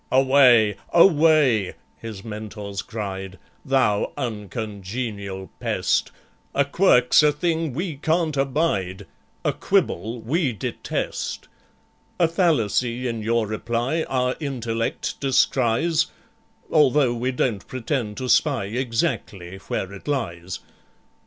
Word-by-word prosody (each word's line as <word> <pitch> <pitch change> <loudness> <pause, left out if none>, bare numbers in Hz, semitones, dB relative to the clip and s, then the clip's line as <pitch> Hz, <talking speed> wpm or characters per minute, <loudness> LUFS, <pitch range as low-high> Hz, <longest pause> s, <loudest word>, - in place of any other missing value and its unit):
"Away, 130 -6 +5
away!" 155 - +4 0.2
his 110 -4 -8
Mentors 105 -2 -6
cried, 95 -3 -6 0.3
"Thou 130 -7 +1
uncongenial 105 -3 -5
pest! - - 0 0.5
A 140 - +3
quirk's 140 -5 +4
a 150 0 +4
thing 160 0 -1
we 170 -2 -3
can't 160 +1 0
abide, 135 - -1 0.4
A - - +2
quibble 115 +7 0
we 135 +3 0
detest! 100 - -4 0.7
"A 170 - +5
fallacy 125 - +1
in 115 -2 -3
your 115 +1 +1
reply 120 +8 -1
Our 125 -1 0
intellect 115 -6 -3
descries, 135 +3 +2 0.6
Although 145 -4 +4
we 120 +2 -1
don't 120 -5 -1
pretend 125 -4 -3
to 130 - -3
spy 135 -4 +3
Exactly 105 -5 -2
where 95 +1 -3
it 100 - -11
lies. 90 -11 -3
120 Hz, 105 wpm, -23 LUFS, 105-140 Hz, 0.7 s, Away